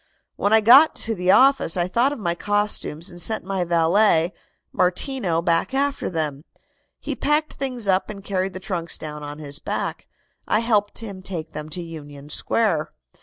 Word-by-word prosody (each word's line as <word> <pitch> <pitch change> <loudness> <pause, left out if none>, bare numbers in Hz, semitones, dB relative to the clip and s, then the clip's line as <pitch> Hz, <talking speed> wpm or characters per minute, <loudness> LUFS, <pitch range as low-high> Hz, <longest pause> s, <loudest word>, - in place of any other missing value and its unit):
"When 205 - 0
I 220 0 +6
got 270 +9 +7
to 225 - -3
the 180 -3 -2
office 265 -7 +4
I 175 0 +1
thought 240 +8 +2
of 290 - -5
my 175 -6 -1
costumes 205 -4 -1
and 175 0 -7
sent 220 +5 -2
my 190 -1 -1
valet, 170 +1 +3 0.4
Martino, 180 -2 0
back 170 +9 +1
after 280 +1 0
them. 150 -4 -2 0.6
He - - -3
packed 300 +2 +1
things 250 -5 -3
up 190 0 +2
and 200 -2 -8
carried 190 -1 -2
the 185 - -6
trunks 180 -3 -3
down 150 -1 -7
on 145 0 -7
his 145 -1 -6
back. - - -4 0.4
I 215 - +2
helped 210 -3 +1
him 200 -5 -6
take 170 -4 -5
them 150 0 -6
to 175 +3 -3
Union 145 -3 -10
Square." 170 -2 0
185 Hz, 175 wpm, -22 LUFS, 165-220 Hz, 0.6 s, got